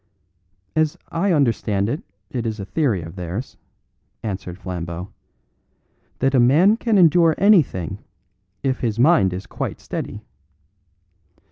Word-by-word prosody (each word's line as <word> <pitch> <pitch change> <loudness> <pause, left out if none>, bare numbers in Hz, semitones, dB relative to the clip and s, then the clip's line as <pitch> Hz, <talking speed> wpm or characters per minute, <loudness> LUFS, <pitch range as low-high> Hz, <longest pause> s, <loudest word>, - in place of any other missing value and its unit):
"As 155 -1 +1
I 180 +4 0
understand 115 - +1
it, 145 +7 -2 0.3
it 120 -2 -2
is 110 -1 -4
a 100 - -5
theory 100 - 0
of 80 +2 -9
theirs," 95 +7 -5 0.7
answered 95 -4 -5
Flambeau, 90 -1 -6 1.1
"that 135 +1 +1
a 130 - +4
man 155 - +5
can 230 -2 +1
endure 165 -2 +5
anything 165 - +3 0.6
if 130 -1 0
his 115 -3 -1
mind 125 - +4
is 90 +2 -5
quite - - -5
steady. - - -6
120 Hz, 125 wpm, -21 LUFS, 95-155 Hz, 1.1 s, man